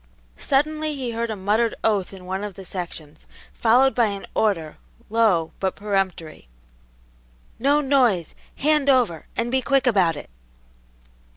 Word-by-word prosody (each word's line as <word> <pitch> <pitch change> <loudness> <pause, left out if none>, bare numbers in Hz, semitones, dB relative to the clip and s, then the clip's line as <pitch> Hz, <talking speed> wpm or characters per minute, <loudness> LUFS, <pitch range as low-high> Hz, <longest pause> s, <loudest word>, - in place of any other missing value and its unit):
Suddenly 305 +2 0
he 255 -3 -3
heard 230 0 -2
a 220 - -2
muttered 210 +4 +1
oath 205 -4 +1
in 190 -2 -11
one 190 +2 -3
of 205 -3 -6
the 195 - -10
sections, 165 -5 -8 0.3
followed 250 +4 +4
by 235 -2 +3
an 200 -1 -5
order, 165 -8 0 0.3
low, 210 -8 +2
but 190 -1 -1
peremptory, 195 - -3 1.1
"No 285 +4 +3
noise! 250 - +2 0.2
Hand 300 -1 +2
over, 240 - +2
and 235 +1 -1
be 260 0 +2
quick 275 0 +1
about 190 -9 +3
it!" 145 - -10
215 Hz, 145 wpm, -23 LUFS, 185-260 Hz, 1.1 s, followed